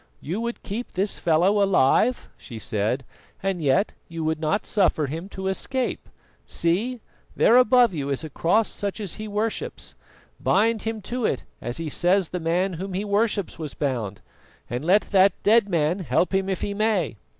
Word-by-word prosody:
"You 180 +9 -4
would 235 0 -4
keep 225 +5 -5
this 195 +2 -1
fellow 175 +5 +3
alive?" 195 - +3
she 115 - -10
said, 110 +4 -1 0.4
"and 195 -3 -1
yet 140 +7 +2
you 165 -1 -5
would 160 0 -1
not 160 +7 0
suffer 185 -7 +2
him 165 +7 -5
to 190 -1 -5
escape. 255 +6 -2 0.4
See, 215 +9 0 0.3
there 230 - +5
above 250 -3 +5
you 140 -4 -3
is 140 +2 -1
a 155 - -6
cross 205 +10 +2
such 200 +1 -4
as 200 -5 -4
he 215 - -5
worships. 220 - -3 0.5
Bind 220 +1 +2
him 225 -2 -4
to 245 +3 -2
it 130 - -2 0.2
as 120 - -4
he 165 -1 -4
says 175 +4 +2
the 180 - -3
Man 175 +3 0
whom 195 0 -5
he 200 +3 -2
worships 205 -3 0
was 155 -3 -6
bound, 115 -8 -2 0.5
and 120 +3 -4
let 190 +6 +4
that 195 0 +5
dead 220 -1 +4
Man 170 +1 +1
help 180 +1 0
him 190 0 +1
if 190 - -2
he 205 - -2
may." 200 - 0
190 Hz, 180 wpm, -24 LUFS, 160-215 Hz, 0.5 s, there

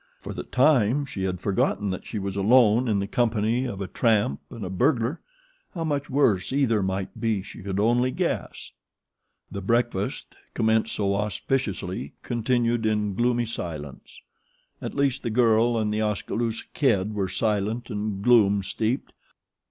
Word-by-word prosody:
For - - -7
the - - -5
time 130 0 +3
she 95 -8 -4
had 90 -1 -2
forgotten 100 +1 0
that 95 - -6
she 110 - -4
was 100 -1 -3
alone 115 +3 +4
in 105 -3 +2
the 100 - -1
company 115 +2 +1
of 100 -6 -5
a 95 - -3
tramp 100 - +1
and 115 -5 -7
a - - -4
burglar 125 - +1 0.5
how 165 - -2
much 145 -3 -2
worse 130 -9 +2
either 130 -6 +2
might 95 0 -3
be 110 -4 0
she - - -11
could 100 0 -3
only 120 +4 +3
guess. - - -3 0.8
The 100 - -5
breakfast, 115 -1 -1 0.2
commenced 110 0 +1
so 100 -1 0
auspiciously, 100 - -2
continued 120 0 0
in 105 -2 0
gloomy 120 +3 +1
silence. 80 - -7 0.6
At - - -5
least 135 -1 +1
the - - -2
girl 115 0 +3
and 105 -1 0
The 110 - 0
Oskaloosa 110 +2 -2
Kid 105 -8 +1
were 100 -3 -1
silent 110 +4 -1
and 105 -2 -3
gloom 100 -5 +4
steeped. 110 +6 -2
110 Hz, 155 wpm, -25 LUFS, 100-120 Hz, 0.8 s, alone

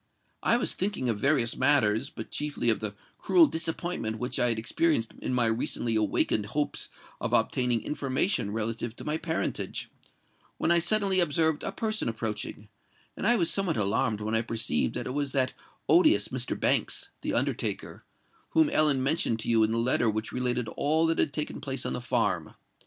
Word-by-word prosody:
I 235 - +3
was - - 0
thinking 190 -10 -1
of 110 -3 -1
various 135 -4 +2
matters,—but 130 -3 +1
chiefly 145 -5 +1
of 110 - 0
the 105 -2 -3 0.2
cruel 345 -3 +5
disappointment 165 - -3
which 125 +2 -3
I 120 - +3
had 115 - +1
experienced 115 +2 0
in - - -3
my 125 -2 +2
recently 115 0 -1
awakened 105 -1 +1
hopes 145 +6 -2 0.3
of - - -3
obtaining 125 -2 +1
information 135 - 0
relative 110 +2 -3
to - - -9
my 150 +1 -1
parentage,—when 160 0 -5
I 170 - +5
suddenly 195 +1 +1
observed 160 -2 +2
a - - -2
person 215 - -2
approaching; 110 -2 -4 0.5
and - - -2
I 240 - +5
was 170 -7 +2
somewhat 195 -5 0
alarmed 105 +1 0
when 110 +1 -3
I 115 - +3
perceived 115 -9 -1
that - - -3
it - - -4
was 145 -1 -2
that 130 -2 +1 0.3
odious 340 -2 +4
Mr. - - -3
Banks, - - +1
the - - -2
undertaker, - - -1 0.5
whom 315 -2 +4
Ellen 150 - +3
mentioned 135 -5 +1
to - - -3
you 115 -1 +4
in 110 - +2
the 115 - 0
letter 120 0 +2
which 110 +1 -3
related 125 -2 -1
all 155 +3 +1
that 165 0 +1
had - - +2
taken 150 +1 -4
place 135 -1 -4
at - - -2
the - - -4
farm. 105 -10 -1
130 Hz, 180 wpm, -28 LUFS, 115-160 Hz, 0.5 s, cruel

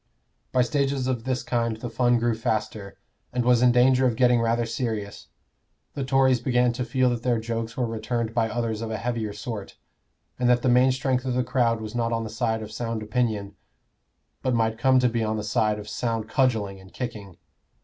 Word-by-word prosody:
By 125 -1 +3
stages 140 -1 0
of 125 -3 -2
this 130 -1 -1
kind 115 -2 -1
the 120 - -6
fun 120 0 +2
grew 120 0 +1
faster, 110 -2 -3 0.3
and 125 -1 -1
was 125 -1 +4
in 125 -1 +6
danger 130 +1 +4
of 120 - 0
getting 125 -1 +4
rather 115 +1 +1
serious. 110 -3 -4 0.7
The 140 - -3
Tories 130 -1 +3
began 125 0 +2
to 125 - -3
feel 125 +1 +2
that 120 -1 -2
their 120 -2 +1
jokes 115 0 -4
were 125 - +1
returned 115 0 -3
by 115 -1 +1
others 115 -1 -2
of 115 - -4
a 110 - -2
heavier 115 -1 -2
sort, 110 -3 -7 0.6
and 125 -1 +2
that 125 -1 +3
the 130 - +3
main 125 +2 +5
strength 130 -1 0
of 125 -1 -1
the 125 - +2
crowd 120 -2 +1
was 110 0 -6
not 115 -1 -1
on 115 -1 -1
the 110 - -6
side 110 -1 -1
of 110 - -9
sound 115 -1 -3
opinion, 105 -3 -1 0.9
but 130 -2 0
might 110 -1 0
come 130 +1 +4
to 125 -1 +4
be 115 -1 -1
on 110 0 -1
the 105 - -3
side 105 0 +1
of 105 0 -8
sound 115 0 -2
cudgelling 110 -6 0
and 95 0 -16
kicking. 105 -8 -6
120 Hz, 210 wpm, -25 LUFS, 110-125 Hz, 0.9 s, in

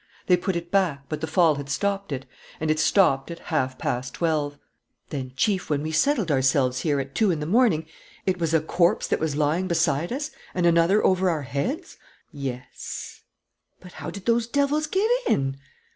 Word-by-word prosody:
They 180 - +5
put 180 +1 -2
it 170 0 -4
back; 175 -8 +1
but 155 -1 -4
the 160 - -2
fall 160 -2 +3
had 140 0 -6
stopped 195 +6 -1
it. 135 -1 -4 0.3
And 155 0 +1
it 155 - 0
stopped 155 -6 +3
at 170 - -6
half 130 -7 -2
past 125 +1 -3
twelve." 150 -4 0 0.5
"Then, 130 -3 -4
Chief, 195 - 0
when 145 -1 0
we 155 - -3
settled 200 - +2
ourselves 130 -1 +2
here, 145 +1 0
at 135 0 -5
two 220 -3 +2
in 165 -4 0
the 150 - -3
morning, 180 -4 +3 0.4
it 185 -1 0
was 165 -2 0
a 160 -1 +3
corpse 170 +2 +2
that - - 0
was 155 -2 -1
lying 155 +5 +1
beside 170 -1 +1
us 295 +4 -3 0.2
and 180 -1 +1
another 170 +4 +4
over 185 0 +3
our 155 -4 -1
heads?" 145 - -3 0.3
"Yes." 135 -5 -6 0.6
"But 180 - -13
how - - -4
did 200 -2 -9
those 235 -1 +2
devils 285 +4 +1
get 385 +7 +1 0.2
in?" 135 0 +1
160 Hz, 190 wpm, -25 LUFS, 140-190 Hz, 0.6 s, They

